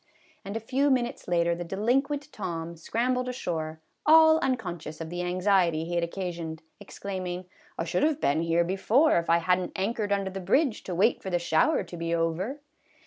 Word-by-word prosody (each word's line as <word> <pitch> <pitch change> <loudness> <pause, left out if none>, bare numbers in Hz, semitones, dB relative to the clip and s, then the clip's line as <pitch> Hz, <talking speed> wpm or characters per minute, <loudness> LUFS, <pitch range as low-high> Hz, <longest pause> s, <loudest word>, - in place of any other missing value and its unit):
And 200 +3 -4
a - - -2
few 265 +6 +1
minutes 250 -2 0
later 170 -1 +2
the 175 +1 -4
delinquent 270 - -1
Tom 170 -4 -5
scrambled 250 +9 -1
ashore, 160 -9 -4 0.2
all 315 0 +7
unconscious 175 - -3
of 165 0 -6
the 175 0 -3
anxiety 180 -3 +2
he 175 - -5
had 170 0 +1
occasioned, 170 -3 -5 0.2
exclaiming, 185 -2 -5 0.2
" - - -29
I - - -1
should - - -1
have 305 0 +2
been 150 - +1
here 165 +1 +2
before 200 - +3
if 170 - -5
I 170 - +6
had 180 +2 +2
n't 180 - -5
anchored 205 +1 -1
under 195 -1 0
the 195 - -5
bridge 265 - +1
to 180 - -4
wait 215 +7 +2
for 190 - -5
the 175 - +1
shower 280 - +2
to 175 - -9
be 170 0 -1
over." 175 - -2
185 Hz, 195 wpm, -27 LUFS, 170-240 Hz, 0.2 s, all